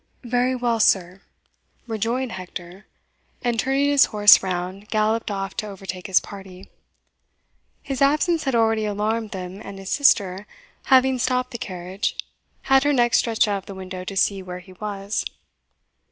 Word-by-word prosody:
"Very 245 +1 +1
well, 240 -2 0
sir," 190 -2 +2 0.6
rejoined 230 +3 -2
Hector, 185 +1 -9 0.6
and, 240 -2 0
turning 270 +3 +1
his 285 -1 +6
horse 205 -1 +7
round, 185 +2 -4
galloped 220 +1 0
off 195 -1 -4
to 215 - -2
overtake 190 -2 -7
his 190 - +4
party. 195 -1 -12 1.1
His 270 -1 -4
absence 305 +4 +2
had 270 -3 0
already 225 -1 +2
alarmed 215 +2 -1
them, 190 0 -7
and 195 - -9
his 195 0 -7
sister, 200 -8 +2 0.4
having 260 -1 +4
stopped 255 0 0
the 235 - -6
carriage, 185 0 -4 0.5
had 270 0 +4
her 290 0 +2
neck 240 -3 +2
stretched 225 -2 +3
out 200 -1 0
of 190 - -18
the 195 - -8
window 185 -1 -7
to 195 +1 -5
see 195 0 +2
where 180 -1 -7
he 185 +1 -13
was. 200 +1 -4
210 Hz, 155 wpm, -23 LUFS, 190-245 Hz, 1.1 s, horse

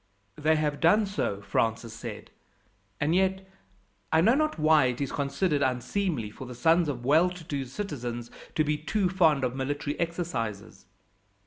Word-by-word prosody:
"They 155 +1 +2
have 150 -2 -1
done 205 +6 +4
so," 100 - -2
Francis 115 +2 -1
said; 115 - -8 0.7
"and 150 +2 +1
yet, 190 +1 +1 0.6
I 160 - +4
know 220 +8 +5
not 310 -2 +1
why, 155 -2 +5
it 125 -1 -1
is 140 -2 -2
considered 145 +2 0
unseemly 130 - -1
for 130 +4 -9
the 125 - -8
sons 165 +5 +3
of 120 -4 -4
well 160 +6 +5
to 180 -1 -9
do 145 -5 -3
citizens 120 - -5 0.2
to 155 - +3
be 150 0 0
too 185 +4 0
fond 160 -7 +3
of 125 0 -1
military 145 +2 -3
exercises." 155 - -4
150 Hz, 160 wpm, -28 LUFS, 125-175 Hz, 0.7 s, know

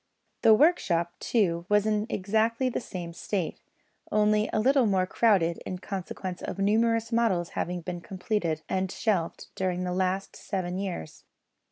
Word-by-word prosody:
The 225 -2 +7
workshop, 180 - +3
too, 175 -7 +1
was 210 0 +4
in 215 0 +1
exactly 220 +6 +1
the 250 - -3
same 175 -6 -6
state, 180 0 -3 0.5
only 210 0 +3
a - - +1
little 260 +1 +4
more 190 -2 +2
crowded 185 -5 +2
in 185 - -4
consequence 185 -1 -5
of - - -5
numerous 225 +3 +2
models 220 -8 +1
having 175 0 -3
been 175 0 -5
completed 180 -4 -2
and 190 0 -1
shelved 195 -8 -1
during 180 -1 -1
the 180 -1 -2
last 185 +1 -1
seven 185 -2 -3
years. 185 - -5
195 Hz, 150 wpm, -28 LUFS, 180-220 Hz, 0.5 s, The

